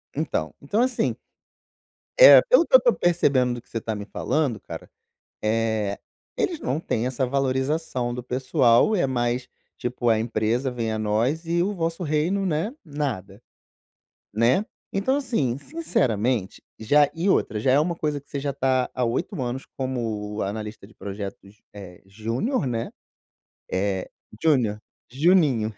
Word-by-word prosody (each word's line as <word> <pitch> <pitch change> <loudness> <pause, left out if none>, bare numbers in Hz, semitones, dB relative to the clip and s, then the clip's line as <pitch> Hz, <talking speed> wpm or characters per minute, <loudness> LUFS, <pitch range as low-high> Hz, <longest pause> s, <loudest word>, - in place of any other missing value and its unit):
Então, 80 -1 -2
então, 205 +11 0
assim 255 0 0 1.0
Eh, - - +11
pelo - - +6
que - - -18
eu - - +12
estou - - +3
percebendo, 140 -8 +2
do 120 - -8
que - - -30
você 115 - -4
está 110 0 -3
me 105 -1 -6
falando, 135 -2 -1
cara, - - -9 0.5
eh, 110 -2 0 0.4
eles 340 -4 -1
não 140 +5 -2
têm 120 -6 -1
essa 130 +1 -1
valorização 130 -1 -1
do 125 - -4
pessoal, 130 - +3
é 155 -8 +1
mais 120 -1 -1 0.3
tipo, 120 -1 -1
a 110 -1 +3
empresa 115 +3 0
vem 115 -3 -3
a 110 - -2
nós, 115 +10 0
e 170 +1 +1
o 205 +2 -1
vosso 165 0 -2
reino, 170 +6 0
né, 165 +6 -1
nada, 120 - -4 0.9
né, 120 - +3 0.3
então, 210 +8 +1
assim, 155 - -1
sinceramente 120 - -1 0.2
já 145 +6 +4
e 175 +4 0
outra, 110 - +1
já 130 +4 +2
é 140 - +5
uma 170 +2 0
coisa, 150 -3 -2
que 140 - -26
você 140 - -3
já 140 +1 -2
está 130 -1 0
há 125 -1 0
8 115 +4 -2
anos 125 +2 -3
como 110 -5 -3
analista 105 +1 -5
de 110 - -20
projetos, 100 +1 -8
é 95 -4 -11
júnior, 115 - -2
né, 115 -2 -2 0.8
é 95 0 -1 0.3
júnior, 125 -9 +2 0.3
"juninho." 140 - +3
125 Hz, 155 wpm, -24 LUFS, 110-155 Hz, 1.0 s, eu